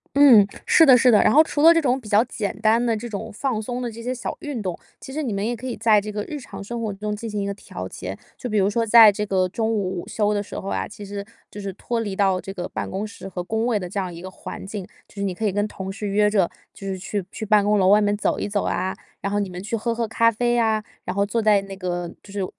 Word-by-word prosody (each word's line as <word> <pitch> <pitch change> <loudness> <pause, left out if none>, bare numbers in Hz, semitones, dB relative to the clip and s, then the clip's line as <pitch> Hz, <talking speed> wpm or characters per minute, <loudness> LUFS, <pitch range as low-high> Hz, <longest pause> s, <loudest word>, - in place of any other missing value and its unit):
嗯， 265 -8 +8 0.2
是 325 - +6
的 260 -4 +8
是 250 +1 +5
的。 220 - +6
然 - - +4
后 305 - +8
除 310 -2 -1
了 330 +2 +9
这 330 - +3
种 255 -2 +2
比 225 -5 -11
较 210 +1 +5
简 210 -5 -4
单 225 +2 +3
的 230 -2 +2
这 235 +3 -6
种 205 -4 -6
放 230 0 -2
松 245 +3 -4
的 245 - -2
这 230 +1 -9
些 250 +2 -2
小 250 - -5
运 285 -6 -4
动， 185 -4 -3 0.2
其 265 - -10
实 310 +2 -2
你 245 - -2
们 200 +1 -2
也 240 +2 -1
可 235 +3 -10
以 250 - -4
在 215 -2 +4
这 210 +1 -6
个 210 0 -3
日 300 - -5
常 255 - -9
生 230 +3 -5
活 220 - -2
中 210 +1 -4
进 225 +2 -6
行 210 -1 -3
一 - - -2
个 200 - -2
调 95 - -8
节。 95 +1 -7 0.2
就 250 - -5
比 215 - 0
如 195 0 +3
说 230 +2 0
在 225 0 +9
这 210 +1 -1
个 190 -2 +1
中 220 +4 -1
午 190 -4 -2
午 - - -11
休 210 -1 +1
的 205 -1 -1
时 - - -7
候 195 - -8
啊， - - -1
其 205 0 -10
实 200 0 -6 0.2
就 205 - -8
是 200 -1 -4
脱 230 +4 -3
离 205 -3 -3
到 190 -2 +2
这 195 - -7
个 180 -2 -4
办 - - -5
公 195 +3 -3
室 200 -2 -10
和 180 -1 -4
工 220 +5 -1
位 235 -4 +1
的 180 - -5
这 200 - -7
样 185 -3 -2
一 170 - -9
个 185 - -7
环 185 - -8
境。 195 -1 -6 0.2
就 - - -22
是 200 - -3
你 195 -2 -1
可 220 +5 -3
以 205 - +2
跟 205 +1 +1
同 190 -2 -6
事 205 +2 -5
约 210 +1 +3
着， 195 -5 +2 0.2
就 195 - -11
是 190 -1 -3
去 200 +1 -3
去 220 - -5
办 210 -1 +4
公 210 0 +3
楼 185 - +4
外 210 +2 +6
面 205 0 +2
走 - - 0
一 - - -3
走 205 0 0
啊， 190 - -1 0.3
然 200 - -2
后 205 - +1
你 200 -2 -2
们 180 0 -7
去 230 +3 -2
喝 230 +2 -2
喝 230 0 -1
咖 230 +1 +3
啡 240 +2 +1
啊， 220 -2 +1 0.2
然 180 - -3
后 200 0 +2
坐 225 +3 -1
在 210 -2 +4
那 195 0 -8
个 175 -2 -3
就 200 - -14
是 200 -2 -1
210 Hz, 330 characters per minute, -23 LUFS, 195-230 Hz, 0.3 s, 了